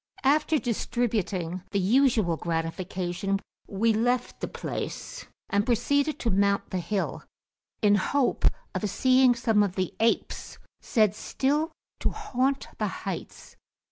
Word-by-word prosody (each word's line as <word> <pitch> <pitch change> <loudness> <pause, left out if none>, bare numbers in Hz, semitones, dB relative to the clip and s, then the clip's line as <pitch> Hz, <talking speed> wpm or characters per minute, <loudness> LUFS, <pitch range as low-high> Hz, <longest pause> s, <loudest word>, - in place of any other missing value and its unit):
After 300 +3 +3
distributing 210 - -1
the 200 - 0
usual 220 -3 +3
gratification, 175 +3 -2 0.3
we 220 +3 +2
left 245 +3 0
the - - -3
place, - - -5 0.2
and 200 0 +2
proceeded 285 +6 +1
to 230 - +1
mount 200 +1 +1
the 185 - -1
hill, 195 +2 -2 0.6
in 205 -1 +6
hope 250 +7 +1 0.3
of 210 - -1
seeing 255 +3 +4
some 225 -3 +2
of 195 -3 0
the 185 -2 -1
apes 225 +1 0 0.2
said 215 -5 +3
still 290 +8 0 0.3
to - - +1
haunt 275 - -1
the - - +1 0.2
heights. - - -6
220 Hz, 125 wpm, -27 LUFS, 195-255 Hz, 0.6 s, in